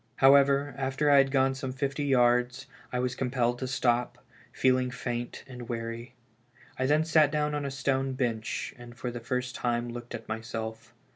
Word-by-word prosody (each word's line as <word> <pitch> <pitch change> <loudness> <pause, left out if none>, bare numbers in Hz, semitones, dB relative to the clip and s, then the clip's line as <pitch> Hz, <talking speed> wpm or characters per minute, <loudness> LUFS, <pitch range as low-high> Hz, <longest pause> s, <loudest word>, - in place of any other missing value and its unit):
Ilowever, 140 +1 +5
after 135 +2 +1
I 140 - +7
had 135 0 +4
gone 135 -1 +2
some 130 0 -4
fifty 135 +2 -2
yards, 125 -1 +2 0.3
I 125 - -1
was 125 0 0
compelled 125 -2 0
to 130 - -3
stop, 125 -2 0 0.3
feeling 130 -1 +2
faint 120 -1 -4
and 125 -3 -9
weary. 115 +1 -5 0.6
I 130 - +1
then 150 +2 +3
sat 155 -2 +5
down 150 -1 0
on 145 -1 -2
a - - -1
stone 135 -1 -1
bench, 120 -4 -2
and 120 -1 -12
for 125 0 -4
the 120 - -6
first 125 +2 -3
time 120 -1 -1
looked 120 0 -7
at 120 - -9
myself. 110 +1 -5
125 Hz, 180 wpm, -29 LUFS, 120-135 Hz, 0.6 s, I